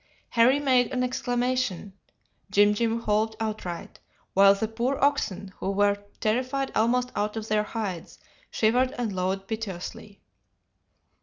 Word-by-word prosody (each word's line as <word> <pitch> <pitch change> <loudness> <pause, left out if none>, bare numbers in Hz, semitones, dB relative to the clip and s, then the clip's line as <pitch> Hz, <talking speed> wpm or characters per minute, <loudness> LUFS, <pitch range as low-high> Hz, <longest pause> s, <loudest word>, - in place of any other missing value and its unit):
"Harry 245 +4 +4
made 255 -4 +3
an 250 -1 0
exclamation, 245 -5 -1 0.6
Jim 205 +1 +5
Jim 230 +1 -1
howled 215 +1 +1
outright, 215 -6 -5 0.3
while 195 +1 +7
the 220 +2 -2
poor 240 +5 -1
oxen, 200 -9 0
who - - -3
were 200 +1 +3 0.2
terrified 255 +5 0
almost 245 +3 +1
out 210 +1 -1
of 220 0 -5
their 215 0 +3
hides, 210 -6 -5 0.3
shivered 250 +4 +2
and 230 -4 -2
lowed 190 +1 -2
piteously. 205 -1 -6
220 Hz, 130 wpm, -26 LUFS, 200-250 Hz, 0.6 s, while